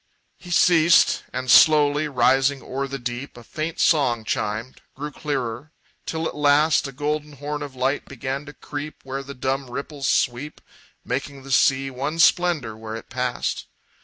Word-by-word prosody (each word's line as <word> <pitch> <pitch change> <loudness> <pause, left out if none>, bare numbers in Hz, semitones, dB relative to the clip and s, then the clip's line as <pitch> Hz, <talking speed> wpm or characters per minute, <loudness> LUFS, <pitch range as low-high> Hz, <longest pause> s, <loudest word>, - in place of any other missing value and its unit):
He 180 - -12
ceased 170 -1 +4
and, 130 0 -1
slowly 150 -1 +6
rising 135 +1 +2
o'er 135 +1 -3
the 140 0 -5
deep, 120 +1 -6
A 120 - -11
faint 155 +7 -5
song 125 -8 +2
chimed, 110 +4 -3
grew 150 +2 -5
clearer, 135 0 -4 0.3
till 160 0 -2
at - - -5
last 150 +1 +3
A - - -7
golden 150 +2 -3
horn 145 +2 -5
of 140 -2 -7
light 130 +3 -1
began 135 +2 -5
to 145 - -9
creep 145 +1 -7
Where 135 +1 -4
the 140 +1 -9
dumb 130 +1 -2
ripples 140 +2 -4
sweep, 125 +5 0 0.5
Making 135 +2 -4
the 135 - -9
sea 135 +1 +3
one 140 +5 -3
splendor 165 -9 +3
where 110 0 -7
it 115 - -10
passed. 125 0 -2
140 Hz, 160 wpm, -23 LUFS, 130-150 Hz, 0.5 s, slowly